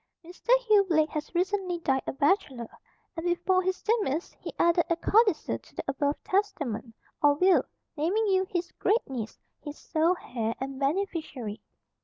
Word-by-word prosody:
Mr. 355 +6 -15
Hugh 430 -4 +5
Blake 315 -2 +3
has 305 +2 -5
recently 370 0 0
died 270 -5 0
a - - 0
bachelor, 270 - 0 0.4
and 330 - -5
before 355 +1 +2
his 375 0 -2
demise 400 - 0
he - - -6
added 340 0 +4
a 335 - +3
codicil 410 0 +2
to - - -22
the - - -4
above 285 +1 0
testament, 285 - -2 0.3
or 290 -1 +5
will, 365 +4 +4 0.3
naming 360 +9 +1
you, 380 -2 +2
his 350 -1 -2
great 445 +4 +2
niece, 235 -5 -5 0.3
his 295 -1 -7
sole 330 +3 +1
heir 230 -2 -3
and 265 0 -5
beneficiary. 285 - -2
335 Hz, 160 wpm, -28 LUFS, 275-375 Hz, 0.4 s, Hugh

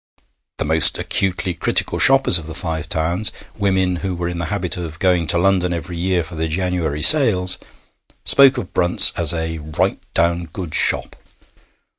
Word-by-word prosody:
The - - -4
most 80 0 +5
acutely 95 -1 -2
critical 85 - -1
shoppers 135 -9 +5
of 80 - -12
the 80 - -9
Five 80 -1 -5
Towns 85 +5 -1 0.2
women 95 -3 -2
who 95 +1 -6
were 85 0 -5
in 85 0 -6
the 85 - -4
habit 100 -4 -2
of 85 -3 -8
going 90 -2 -1
to - - +2
London 90 -1 -1
every 85 +1 -7
year 90 0 -2
for 80 - -11
the 80 0 -4
January 80 -3 -4
sales 105 - +5 0.7
spoke 135 -1 +5
of 100 -7 -8
Brunt's 90 0 +4
as 85 -4 +3
a 80 -1 -5
'right 75 0 -4
down 85 +1 0
good 85 -3 -9
shop.' - - -2
90 Hz, 170 wpm, -17 LUFS, 80-95 Hz, 0.7 s, most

